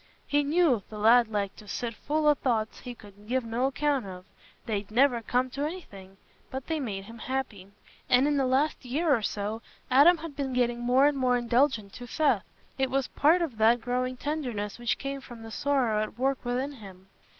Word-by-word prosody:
He 290 0 +2
knew 295 - +3
"th' - - -13
lad 230 +3 +5
liked 205 -3 -3
to 210 - -13
sit 235 +3 -3
full 300 +7 -1
o' 295 - +7
thoughts 230 -6 -1
he 245 -1 -8
could 205 -1 -16
give 255 +1 0
no 235 +3 0
account 275 -4 0
of; 185 -1 -9 0.4
they'd 205 -2 -3
never 245 +1 +3
come 250 +3 0
t' 275 - -5
anything, 200 - -6 0.3
but 265 0 -6
they 320 -1 -2
made 205 -8 -4
him 225 +3 -12
happy," 240 -8 -4 0.4
and 250 +3 +5
in 295 - +1
the 270 -2 +1
last 275 +4 +1
year 285 +4 +1
or 230 - -2
so, 210 +2 -3 0.3
Adam 295 +7 +7
had 320 -2 -8
been 275 -2 -3
getting 240 -1 +1
more 250 +3 +3
and 290 -1 +2
more 250 -1 +3
indulgent 240 -3 +1
to 245 - -9
Seth. 305 +5 +1 0.3
It 265 -1 +1
was 270 0 -1
part 330 +5 +3
of 255 -10 -5
that 230 +2 +5
growing 255 +1 -2
tenderness 245 -9 -3
which 240 0 0
came 275 0 -5
from 240 -3 -11
the 225 - -9
sorrow 250 -5 +1
at 215 +1 -5
work 265 +1 0
within 255 +3 -2
him. 195 -8 -13
250 Hz, 205 wpm, -28 LUFS, 220-275 Hz, 0.4 s, o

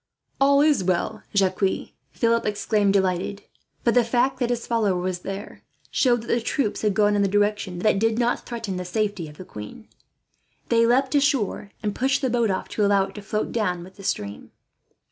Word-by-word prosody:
"All 280 +1 +5
is 295 -9 +3
well, 185 +4 -1
Jacques," 190 0 +1 0.2
Philip 230 -1 +1
exclaimed, 205 -1 +1
delighted; 190 +1 0 0.4
for 235 - +3
the 245 +1 +4
fact 250 +3 +1
that 245 -2 0
his 240 -1 -2
follower 220 -5 +1
was 180 0 -2
there 195 +3 -7 0.3
showed 240 -3 +2
that - - -11
the 235 - +2
troops 230 -1 -1
had 210 -3 +1
gone 210 0 +3
in 205 - +2
the 200 - +3
direction 205 -2 0
that 195 +1 +2
did 225 +1 +1
not 240 0 +1
threaten 225 -6 -4
the 180 - -3
safety 200 -2 -2
of 150 - -15
the 185 - -9
queen. 105 - -10 0.8
They 230 -1 +4
leapt 260 +3 +2
ashore 275 -8 +1
and 210 -1 -1
pushed 270 +4 0
the 260 - +1
boat 235 -2 +2
off, 190 - -2
to 210 - -1
allow 200 -1 +4
it 195 0 -7
to 210 - -8
float 210 +2 -2
down 180 -6 -1
with 185 +1 -14
the 195 - -11
stream. 100 - -3
210 Hz, 200 wpm, -24 LUFS, 195-235 Hz, 0.8 s, All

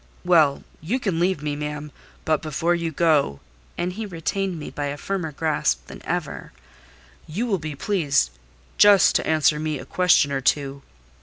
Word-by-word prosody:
"Well, 160 -6 +4 0.2
you 210 - -1
can 190 -9 -1
leave 180 -3 0
me, 150 -1 -2
ma'am: 150 0 -5 0.3
but 155 -2 +1
before 160 +2 0
you 170 -1 -2
go" 150 - +2 0.4
(and 180 +1 -2
he 215 +2 -5
retained 185 +1 -2
me 150 - -7
by 145 - -4
a 145 +1 -4
firmer 180 0 -3
grasp 140 - 0
than - - -11
ever), - - -4 0.7
"you 195 +10 -2
will 200 -6 0
be 155 -1 -6
pleased 145 - +1 0.5
just 205 -2 +7
to - - -4
answer 155 -1 +3
me 155 -1 -2
a 130 - -9
question 180 -6 +3
or 135 -1 -1
two." 140 +1 0
155 Hz, 170 wpm, -23 LUFS, 145-180 Hz, 0.7 s, just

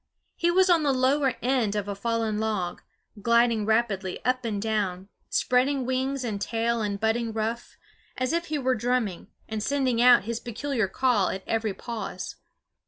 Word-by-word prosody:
He 340 - +1
was 375 +2 +4
on 345 -3 +4
the 290 -2 +2
lower 265 +1 +2
end 245 -5 +1
of 205 -1 -2
a 200 - -2
fallen 225 0 -1
log, 210 -5 -2 0.4
gliding 235 -1 +3
rapidly 215 -4 0
up 255 0 +1
and 210 -3 -1
down, 200 -3 -2 0.2
spreading 260 +1 +1
wings 260 +1 -1
and 210 -4 -3
tail 230 +1 0
and 200 -2 -2
budding 225 +1 0
ruff, 225 +2 -3 0.4
as 255 +4 -1
if 340 0 0
he 300 - -1
were 260 -2 +1
drumming, 240 -5 -1 0.2
and 220 -1 -3
sending 260 -1 +1
out 245 -4 +7
his 230 +2 -3
peculiar 240 -1 -2
call 210 -2 +2
at 190 - -4
every 220 -3 -1
pause. 235 -2 -6
235 Hz, 170 wpm, -26 LUFS, 215-255 Hz, 0.4 s, out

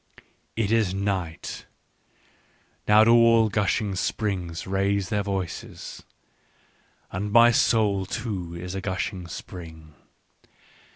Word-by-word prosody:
" - - -42
It 100 - -1
is 110 -5 +2
night: 95 -5 -3 1.2
now 105 +1 +7
do 115 - +5
all 115 -1 +5
gushing 105 0 0
springs 95 -3 -2
raise 95 0 0
their 105 - 0
voices. 95 -3 -5 1.1
And 100 +3 -3
my 120 +2 +7
soul 105 -5 +2
too 90 -7 -4
is 90 +1 -6
a 95 - -4
gushing 95 -1 -3
spring. 80 -3 -10
100 Hz, 110 wpm, -25 LUFS, 90-105 Hz, 1.2 s, now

